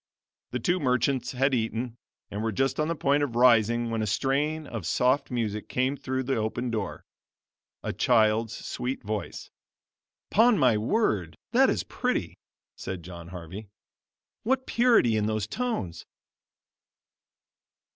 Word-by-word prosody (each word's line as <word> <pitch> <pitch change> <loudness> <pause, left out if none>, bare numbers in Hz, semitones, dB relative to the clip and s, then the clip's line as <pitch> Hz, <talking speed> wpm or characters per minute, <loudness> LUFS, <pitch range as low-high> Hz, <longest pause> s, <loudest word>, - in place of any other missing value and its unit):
The 125 - -3
two 175 +10 +1
merchants 130 -1 +1
had 135 +2 +1
eaten, 115 0 -1 0.4
and 105 - -3
were 110 0 0
just 135 +8 0
on 155 - +1
the 165 - -1
point 145 -1 +2
of 135 -5 -2
rising 120 -1 +4
when 115 -1 -1
a 110 - -1
strain 145 +8 0
of 110 - -5
soft 130 +7 +2
music 110 -4 -3
came 130 +2 0
through 130 -1 -3
the 135 0 -1
open 115 +3 -2
door 100 -10 -4 0.8
a - - -2
child's 110 -1 +2
sweet 130 +1 -4
voice. 105 0 -5 0.8
"'Pon 225 +1 +5
my 125 -7 +4
word, 105 - 0
that - - +5
is - - 0
pretty," - - -2 0.4
said 95 -3 -6
John 85 -1 -9
Harvey; 90 +4 -8 0.7
"what 260 +3 0
purity 230 - +4
in 105 0 +1
those 110 -2 -1
tones!" 110 - -3
120 Hz, 140 wpm, -27 LUFS, 110-135 Hz, 0.8 s, Pon